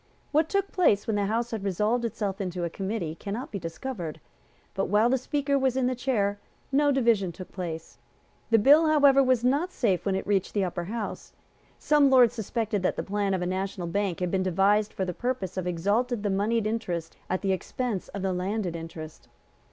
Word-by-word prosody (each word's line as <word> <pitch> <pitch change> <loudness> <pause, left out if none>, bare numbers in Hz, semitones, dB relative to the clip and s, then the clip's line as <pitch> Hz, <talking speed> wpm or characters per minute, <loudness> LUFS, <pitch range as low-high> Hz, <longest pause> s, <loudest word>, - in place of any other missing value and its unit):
What 310 +2 +2
took 395 0 0
place 215 - +3
when 220 - -1
the 200 -1 +1
House 230 +3 -1
had 220 -4 -4
resolved 210 +5 0
itself 205 -3 -3
into 180 -2 -3
a 170 - -2
committee 190 -4 -3
cannot 205 +9 -6
be 200 - -4
discovered; 165 - -5 0.5
but, 195 - -1
while 210 +5 +3
the 265 - +3
Speaker 280 +1 0
was 265 -1 +1
in 260 - +2
the 255 - +1
chair, 215 -5 0 0.3
no 290 +1 +3
division 230 -9 +2
took 185 +2 -10
place. 165 -4 -6 0.5
The 225 - +5
bill, 290 +9 +6
however, 285 -3 +6
was 255 -3 +2
not 285 +9 +1
safe 195 - 0
when 195 -2 0
it 190 - -2
had - - -15
reached 200 -1 0
the 200 - +2
Upper 175 -1 -4
House. 220 +3 -5 0.4
Some 295 -2 +4
Lords 250 -3 +6
suspected 220 -2 -2
that 185 - 0
the - - -3
plan 200 -1 0
of 180 - -2
a - - -1
national 185 0 -3
bank 185 +1 -1
had 180 -1 -1
been 190 - +1
devised 195 +3 +2
for 190 - -2
the 180 - -3
purpose 245 -4 -3
of 185 -1 -3
exalting 205 +7 0
the 205 - 0
moneyed 210 +3 +1
interest 180 -7 -3
at 185 +2 -1
the 195 - +1
expense 215 +1 -3
of 200 - -6
the 190 -1 0
landed 185 0 -2
interest. 165 -1 -8
205 Hz, 205 wpm, -27 LUFS, 185-245 Hz, 0.5 s, bill